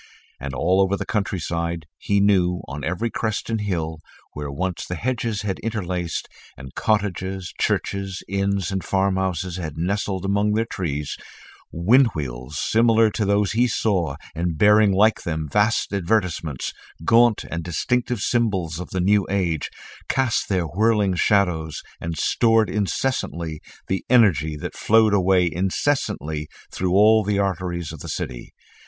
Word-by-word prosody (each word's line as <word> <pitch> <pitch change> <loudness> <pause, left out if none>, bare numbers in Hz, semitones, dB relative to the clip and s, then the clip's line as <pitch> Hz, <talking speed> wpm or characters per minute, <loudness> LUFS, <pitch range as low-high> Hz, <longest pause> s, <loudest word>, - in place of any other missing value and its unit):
And 70 +1 -5
all 90 +6 +2
over 95 +1 +2
the - - -4
countryside, 85 -5 -2
he 100 0 +1
knew, 90 -3 +3
on 70 +1 -6
every 90 +9 -2
crest 110 0 -2
and 110 -2 -1
hill, 80 -6 -2 0.3
where 75 -1 -5
once 90 +6 -3
the 90 - -3
hedges 115 +1 -2
had 100 -2 -2
interlaced, 90 -6 -3 0.3
and 65 -2 -10
cottages, 95 -3 -1
churches, 100 -1 -1
inns, 100 -2 -1
and 95 -1 -2
farm 95 0 +1
houses 95 -1 -2
had 80 -4 -5
nestled 95 +2 -1
among 100 +1 +1
their 110 +1 +1
trees, 75 -9 -4 0.5
wind 115 +11 +4
wheels 65 -1 -5
similar 115 -1 +3
to 105 - -1
those 100 0 +2
he 120 +3 +3
saw 95 - 0 0.2
and 85 -1 -2
bearing 105 +2 +5
like 105 +3 +3
them 80 -2 -3
vast 105 +7 +1
advertisements, 90 - -1 0.3
gaunt 115 +1 +4
and 85 0 -3
distinctive 120 +7 -1
symbols 95 -10 0
of 90 - -6
the 95 - -3
new 100 +2 +3
age, 90 -6 -1 0.4
cast 130 -4 +1
their 95 -4 +1
whirling 105 +2 +2
shadows 90 -5 +1 0.2
and 80 -1 -4
stored 115 +5 +3
incessantly 85 - -2 0.2
the 95 - -2
energy 90 - +4
that 75 - -6
flowed 110 -1 +4
away 95 -2 +4
incessantly 90 - -1 0.2
through 90 -1 -1
all 110 +2 +6
the 100 0 0
arteries 90 -4 -2
of - - -9
the - - -8
city. - - -5
95 Hz, 150 wpm, -23 LUFS, 85-105 Hz, 0.5 s, all